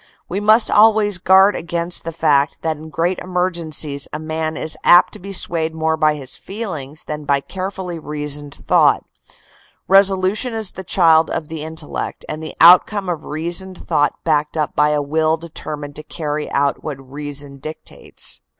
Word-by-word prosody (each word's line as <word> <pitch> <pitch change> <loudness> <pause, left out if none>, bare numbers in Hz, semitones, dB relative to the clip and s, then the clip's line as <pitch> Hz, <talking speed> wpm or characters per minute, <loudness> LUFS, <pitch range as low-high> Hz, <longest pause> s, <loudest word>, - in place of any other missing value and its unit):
We 190 - -3
must 215 +2 +4
always 210 -2 +4
guard 190 +3 +5
against 170 +1 -3
the 165 - -3
fact 150 -3 +1
that 160 -1 0
in 155 +1 -11
great 170 +3 -1
emergencies 170 -6 -2
a - - -3
man 155 0 -3
is 160 - 0
apt 175 +1 +6
to - - -10
be 195 +2 -8
swayed 165 -4 0
more 160 0 0
by 155 -1 +2
his 130 -3 -4
feelings 160 -9 -6
than 150 0 -6
by 140 -1 +2
carefully 185 0 -6
reasoned 145 -1 -3
thought. - - +2 0.8
Resolution 195 +4 +3
is 220 -3 -2
the 190 - -8
child 165 -3 +4
of 155 - -4
the 160 -2 -6
intellect 160 0 -6
and 155 - -5
the 160 - -7
outcome 180 +3 +6
of 165 -3 -4
reasoned 175 +4 -4
thought 145 0 +1
backed 150 -1 0
up 150 -1 -1
by 150 0 +3
a 150 -1 0
will 155 +2 +1
deter 160 -2 -6
mined 145 -1 -9
to - - -4
carry 150 -1 -4
out 140 0 0
what 150 -4 -5
reason 140 +1 -6
dictates... 155 +3 -7
160 Hz, 170 wpm, -19 LUFS, 150-185 Hz, 0.8 s, apt